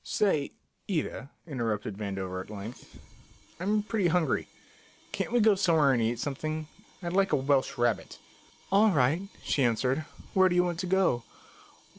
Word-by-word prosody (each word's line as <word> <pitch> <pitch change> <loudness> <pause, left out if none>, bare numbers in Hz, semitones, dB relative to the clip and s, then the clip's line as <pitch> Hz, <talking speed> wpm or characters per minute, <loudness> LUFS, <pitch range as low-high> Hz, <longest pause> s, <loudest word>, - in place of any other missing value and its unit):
"Say, 175 -9 +1 0.4
Ida," 155 -6 -2 0.2
interrupted 115 - -3
Vandover 95 -3 -4
at - - -19
length, 105 +3 -9 0.6
"I'm 205 +3 +1
pretty 210 -3 0
hungry. 170 -1 +1 0.6
Can't - - -3
we 240 - +3
go 220 -1 +6
somewhere 165 -8 +3
and 120 - +1
eat 115 +1 0
something? 155 +3 -3 0.4
I'd 170 0 -3
like 195 +1 +2
a - - +7
Welsh 135 0 +1
rabbit." 120 -1 0 0.5
"All 205 +3 +6
right," 150 0 +2 0.2
she 140 - 0
answered. 125 +5 +1 0.3
"Where 190 -1 +5
do 175 - 0
you 180 - +5
want 175 -2 -2
to 185 - -2
go?" 180 -10 +2
155 Hz, 155 wpm, -29 LUFS, 120-185 Hz, 0.6 s, a